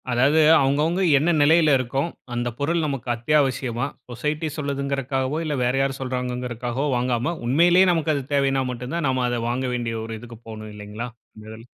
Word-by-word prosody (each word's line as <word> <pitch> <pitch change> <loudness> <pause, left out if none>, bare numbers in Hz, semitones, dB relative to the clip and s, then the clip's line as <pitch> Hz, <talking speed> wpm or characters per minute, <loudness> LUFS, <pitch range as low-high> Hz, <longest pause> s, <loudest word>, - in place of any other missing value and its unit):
அதாவது, 135 +6 +3 0.2
அவங்கவங்க 150 +7 +1 0.2
என்ன 160 +5 +2
நிலைல 155 0 +5
இருக்கோம்? 135 +5 -2 0.2
அந்த 120 0 -1
பொருள் 165 +4 0
நமக்கு 135 -4 -4
அத்தியாவசியமா? 130 -1 0 0.2
சொசைட்டி 150 +6 -2
சொல்லுதுங்கிறதுக்காகவோ, 140 -1 -2
இல்ல 150 -2 -1
வேற 125 +1 +1
யாரும் 135 0 -1
சொல்றாங்கங்கிறதுக்காகவோ 125 0 -3
வாங்காம, 125 +6 -1
உண்மையிலேயே 175 +7 +5
நமக்கு 160 -2 +1
அது 140 - -2
தேவைன்னா 135 -1 +2
மட்டும்தான் 130 +6 -3
நாம 130 -1 0
அத 120 -1 -1
வாங்க 130 +2 -1
வேண்டிய 115 -2 -3
ஒரு 115 0 -6
இதுக்கு 120 -2 -11
போணும் 110 -1 -8
இல்லைங்களா? 105 +3 -7 0.3
இந்ததுல. 110 +1 -11
130 Hz, 155 wpm, -23 LUFS, 120-145 Hz, 0.3 s, நிலைல